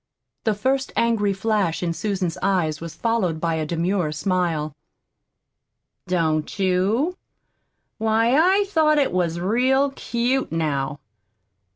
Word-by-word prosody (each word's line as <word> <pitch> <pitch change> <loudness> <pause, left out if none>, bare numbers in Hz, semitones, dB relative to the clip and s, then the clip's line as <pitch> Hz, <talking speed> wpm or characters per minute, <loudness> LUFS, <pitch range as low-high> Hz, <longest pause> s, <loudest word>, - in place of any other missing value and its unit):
The 220 -2 +2
first 265 +5 0
angry 225 -3 +2
flash 195 -4 0
in 170 -1 0
Susan's 185 -3 -2
eyes 175 -6 0
was 165 -1 -7
followed 210 -9 0
by 165 0 0
a 160 -1 -2
demure 170 0 0
smile. 155 -2 -1 1.3
"Don't 160 -3 0
you? 200 - +1 0.8
Why, 225 +3 +2
I 375 +6 +4
thought 315 -6 +2
it 285 - +2
was 170 -2 0
real 260 +8 +2
cute, 255 0 -1
now." 145 -4 -1
195 Hz, 115 wpm, -23 LUFS, 165-235 Hz, 1.3 s, I